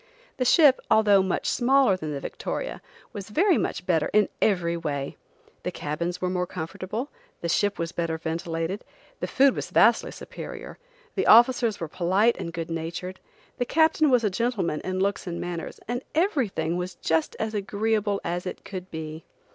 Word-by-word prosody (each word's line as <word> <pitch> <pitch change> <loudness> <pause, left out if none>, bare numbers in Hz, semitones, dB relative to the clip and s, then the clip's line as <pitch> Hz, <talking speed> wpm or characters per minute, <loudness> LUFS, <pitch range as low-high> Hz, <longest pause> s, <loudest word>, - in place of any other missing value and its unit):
The 255 - 0
ship, 285 0 +6
although 205 -3 +5
much 190 -1 -1
smaller 260 -4 +4
than 155 -4 -5
the 140 - -3
Victoria, - - -5 0.3
was 205 -2 -7
very 355 - +3
much 175 - -3
better 165 -4 +1
in 210 0 +4
every 175 -5 +2
way. 145 -4 -3 0.5
The - - -2
cabins 170 +4 -3
were 185 - -1
more 180 -1 -1
comfortable, 185 - -5 0.3
the 170 - -2
ship 205 +4 +1
was 165 0 -3
better 165 -1 -2
ventilated, 165 +4 -3 0.4
the - - -2
food 275 0 +4
was - - -4
vastly - - +4
superior, - - -9 0.3
the 390 - -1
officers 235 -1 +6
were 165 - -3
polite 190 +8 +2
and 170 - -4
good 165 -1 -5
natured, 170 +3 -4 0.4
the 245 - +1
captain 315 +2 +3
was 250 -3 +4
a 210 - +1
gentleman 195 -7 -1
in 185 0 -3
looks 200 0 -1
and 170 -1 -4
manners, 175 -2 -5
and 245 +2 -2
everything 230 - +1
was 180 0 -4
just 160 -1 0
as 220 0 -2
agreeable 210 0 0
as 175 +2 -2
it - - -7
could 185 -1 -7
be. 160 0 -6
185 Hz, 170 wpm, -26 LUFS, 170-225 Hz, 0.5 s, ship